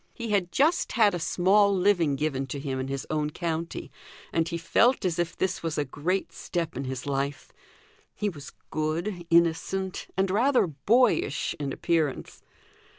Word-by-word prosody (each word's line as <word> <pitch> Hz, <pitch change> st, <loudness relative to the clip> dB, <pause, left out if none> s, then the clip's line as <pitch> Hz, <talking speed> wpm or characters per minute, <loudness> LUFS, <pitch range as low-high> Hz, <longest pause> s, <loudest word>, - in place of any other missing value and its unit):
He 235 Hz, -2 st, -4 dB
had 185 Hz, -4 st, +1 dB
just 315 Hz, +5 st, +2 dB
had 215 Hz, -4 st, +4 dB
a 175 Hz, -, -2 dB
small 195 Hz, +5 st, +3 dB
living 180 Hz, -6 st, +3 dB
given 135 Hz, -2 st, -2 dB
to 140 Hz, +2 st, -5 dB
him 135 Hz, -2 st, -3 dB
in 130 Hz, -, -3 dB
his 135 Hz, 0 st, -4 dB
own 150 Hz, -1 st, 0 dB
county, 165 Hz, +1 st, -4 dB, 0.4 s
and 165 Hz, 0 st, +1 dB
he 170 Hz, -, -2 dB
felt 230 Hz, +8 st, +2 dB
as 175 Hz, -2 st, 0 dB
if 175 Hz, -1 st, -1 dB
this 185 Hz, -1 st, -1 dB
was 165 Hz, -2 st, -3 dB
a 150 Hz, -, +1 dB
great 170 Hz, +8 st, -2 dB
step 170 Hz, -2 st, -3 dB
in 135 Hz, -, -4 dB
his 130 Hz, 0 st, -5 dB
life. 140 Hz, 0 st, -3 dB, 0.6 s
He 210 Hz, -, -1 dB
was 150 Hz, -8 st, -7 dB, 0.2 s
good, 170 Hz, +4 st, -2 dB
innocent, 170 Hz, +3 st, +1 dB
and 190 Hz, 0 st, +2 dB
rather 250 Hz, +5 st, +3 dB
boyish 180 Hz, -, +2 dB
in 140 Hz, -2 st, -2 dB
appearance. 160 Hz, -3 st, -1 dB
170 Hz, 165 wpm, -27 LUFS, 145-195 Hz, 0.6 s, had